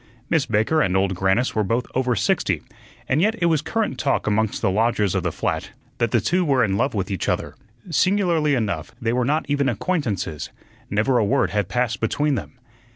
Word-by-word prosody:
Miss 160 -4 +2
Baker 110 +9 +2
and 95 0 +2
Old 95 0 +1
Grannis 95 +7 +1
were 110 - +1
both 115 +5 0
over 125 -1 +1
sixty, - - 0 0.4
and 145 +5 +2
yet 215 +4 +2
it 170 - +1
was 160 -4 +2
current 165 - -2
talk - - 0
amongst 110 0 0
the 100 - +1
lodgers 105 -1 +1
of - - 0
the - - -1
flat - - -2 0.3
that 115 - +2
the 120 - +2
two 180 - +1
were 135 -6 +3
in 100 -4 +1
love 100 - 0
with 95 -1 -2
each 95 - -2
other. - - -1 0.4
Singularly 165 -1 +2
enough, 100 - -3
they 115 0 -1
were 125 0 +1
not 150 +4 +1
even 140 -1 +1
acquaintances; 110 - -2 0.4
never 110 +5 +2
a - - +3
word 100 - +1
had 105 -3 -1
passed 120 -4 0
between 145 +7 0
them. 130 - -4
120 Hz, 205 wpm, -22 LUFS, 105-145 Hz, 0.4 s, were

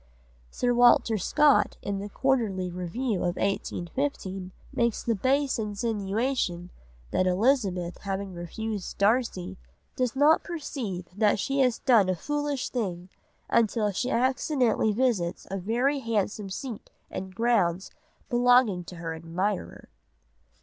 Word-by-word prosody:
Sir 245 0 0
Walter 240 -2 +5
Scott 265 - +3
in 200 -1 -2
the 205 +1 -6
Quarterly 205 -8 0
Review 190 +6 -2
of 175 0 -1
1815 195 0 -3 0.2
makes 235 -2 0
the 235 - +1
base 265 +5 +1
insinuation 210 -3 -2 0.4
that 185 - +2
Elizabeth 185 -4 +1
having 195 -1 -4
refused 200 +4 -5
Darcy 205 - +1 0.4
"does 255 -1 -1
not 295 +4 +5
perceive 265 - -5
that 210 0 +3
she 275 +7 -1
has 250 -4 +3
done 225 -8 +4
a 185 - +1
foolish 290 - -2
thing, 185 -7 -3 0.4
until 220 -2 +2
she 245 +6 -2
accidentally 255 -2 +1
visits 210 -7 0
a 195 - -2
very 245 +9 +1
handsome 210 -4 -2
seat 225 +3 -6 0.2
and 190 0 -6
grounds 195 -6 +1 0.4
belonging 245 -6 +4
to 180 - -9
her 165 -1 -5
admirer." 175 +5 -3
215 Hz, 120 wpm, -27 LUFS, 185-250 Hz, 0.4 s, Walter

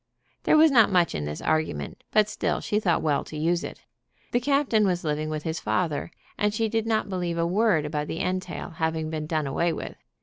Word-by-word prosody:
There - - +5
was 315 0 +7
not 230 -6 +5
much 175 -2 +3
in 75 - -3
this 75 +1 -5
argument, 155 - -1
but 215 -1 +3
still - - -1
she 210 - 0
thought 175 -6 +1
well 150 -3 +1
to 155 - -8
use 170 +3 +1
it. - - -8 0.5
The 240 - +2
captain 275 -4 +2
was 180 -2 0
living 155 0 -1
with 155 -1 -3
his 160 -1 -2
father, 165 -5 -1 0.3
and 210 0 +1
she 225 +1 +1
did 225 0 -1
not 220 -2 +1
believe 180 -3 -2
a 170 - +1
word 185 -3 +2
about 150 0 -2
the 165 - -4
entail 185 -1 -3
having 160 -1 -2
been 155 -1 -3
done 155 -2 -1
away 165 +5 0
with. - - -6
170 Hz, 215 wpm, -26 LUFS, 155-210 Hz, 0.5 s, was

